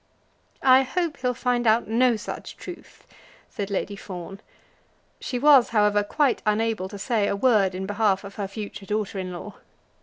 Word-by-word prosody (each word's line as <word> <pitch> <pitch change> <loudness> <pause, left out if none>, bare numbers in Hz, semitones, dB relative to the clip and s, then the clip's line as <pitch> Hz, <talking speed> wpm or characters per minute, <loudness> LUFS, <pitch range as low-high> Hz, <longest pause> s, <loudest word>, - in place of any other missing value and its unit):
"I 260 0 +7
hope 320 +2 -2
he'll 250 -1 -1
find 245 -1 0
out 220 +2 +3
no 240 +2 +3
such 215 - -7
truth," - - -11 0.5
said 205 -5 -4
Lady 200 0 -2
Fawn. 195 0 -8 0.8
She 250 - -4
was, 275 -1 +6
however, 210 -2 +3
quite 275 +5 +1
unable 215 -3 0
to 205 - -8
say 210 0 0
a - - 0
word 200 -5 +3
in 190 +1 -4
behalf 205 -1 +1
of 200 0 -9
her 200 -2 -4
future 200 -1 -8
daughter 210 -2 -2
in 185 -1 -4
law. 185 +4 -8
210 Hz, 170 wpm, -24 LUFS, 200-245 Hz, 0.8 s, I